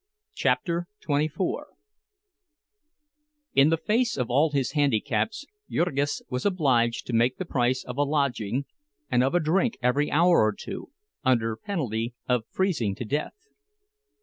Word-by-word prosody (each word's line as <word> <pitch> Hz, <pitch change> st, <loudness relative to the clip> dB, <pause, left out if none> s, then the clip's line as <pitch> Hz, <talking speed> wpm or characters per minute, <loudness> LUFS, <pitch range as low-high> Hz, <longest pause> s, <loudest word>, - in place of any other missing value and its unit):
CHAPTER 175 Hz, -, 0 dB, 0.2 s
XXIV 150 Hz, +4 st, 0 dB, 2.1 s
In 140 Hz, +2 st, +5 dB
the 165 Hz, -, +2 dB
face 230 Hz, -, +1 dB
of 125 Hz, -2 st, -2 dB
all 145 Hz, +6 st, +4 dB
his 135 Hz, -4 st, 0 dB
handicaps, 145 Hz, -, 0 dB, 0.2 s
Jurgis 145 Hz, -4 st, 0 dB
was 125 Hz, -1 st, -3 dB
obliged 130 Hz, -11 st, +2 dB
to 125 Hz, -, -5 dB
make 120 Hz, +3 st, +2 dB
the 185 Hz, -, -4 dB
price 130 Hz, -4 st, 0 dB
of 125 Hz, +1 st, -7 dB
a -, -, +2 dB
lodging, 140 Hz, -4 st, 0 dB, 0.5 s
and 125 Hz, -, +4 dB
of 135 Hz, +6 st, +1 dB
a -, -, +5 dB
drink 190 Hz, +8 st, +1 dB
every 130 Hz, +4 st, +1 dB
hour 170 Hz, +3 st, +4 dB
or 110 Hz, 0 st, +2 dB
two, -, -, -7 dB, 0.3 s
under 115 Hz, -3 st, +2 dB
penalty 120 Hz, -, -3 dB
of 125 Hz, -3 st, +1 dB
freezing 155 Hz, -, 0 dB
to 120 Hz, -, -5 dB
death. 150 Hz, -, -3 dB
140 Hz, 140 wpm, -26 LUFS, 125-170 Hz, 2.1 s, In